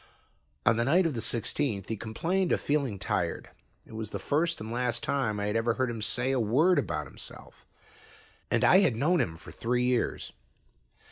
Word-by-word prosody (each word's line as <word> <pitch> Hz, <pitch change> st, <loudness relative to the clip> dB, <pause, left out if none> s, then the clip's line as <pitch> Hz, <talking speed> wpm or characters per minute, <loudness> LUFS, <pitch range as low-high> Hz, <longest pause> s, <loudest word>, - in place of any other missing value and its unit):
On 115 Hz, -, +4 dB
the 115 Hz, -, +2 dB
night 170 Hz, +9 st, +3 dB
of 165 Hz, -, 0 dB
the 115 Hz, -, -3 dB
sixteenth 115 Hz, -2 st, -1 dB
he 110 Hz, -, -2 dB
complained 165 Hz, -, -1 dB
of -, -, +2 dB
feeling 140 Hz, -8 st, 0 dB
tired. 95 Hz, -, -2 dB, 0.3 s
It -, -, -15 dB
was 110 Hz, -1 st, -5 dB
the -, -, -4 dB
first 160 Hz, +3 st, 0 dB
and 110 Hz, +1 st, -6 dB
last 120 Hz, 0 st, -1 dB
time 130 Hz, -7 st, 0 dB
I 100 Hz, -, -1 dB
had 105 Hz, +1 st, -1 dB
ever 115 Hz, 0 st, +1 dB
heard 130 Hz, -2 st, 0 dB
him 115 Hz, -2 st, -5 dB
say 125 Hz, +4 st, 0 dB
a 135 Hz, -, +1 dB
word 140 Hz, -, +3 dB
about -, -, -2 dB
himself, -, -, -11 dB, 0.8 s
and -, -, +1 dB
I 190 Hz, -, +7 dB
had 170 Hz, -, +3 dB
known 165 Hz, +9 st, +2 dB
him 80 Hz, -2 st, -3 dB
for -, -, -11 dB
three 125 Hz, +1 st, -1 dB
years. 125 Hz, -1 st, 0 dB
120 Hz, 195 wpm, -29 LUFS, 110-145 Hz, 0.8 s, I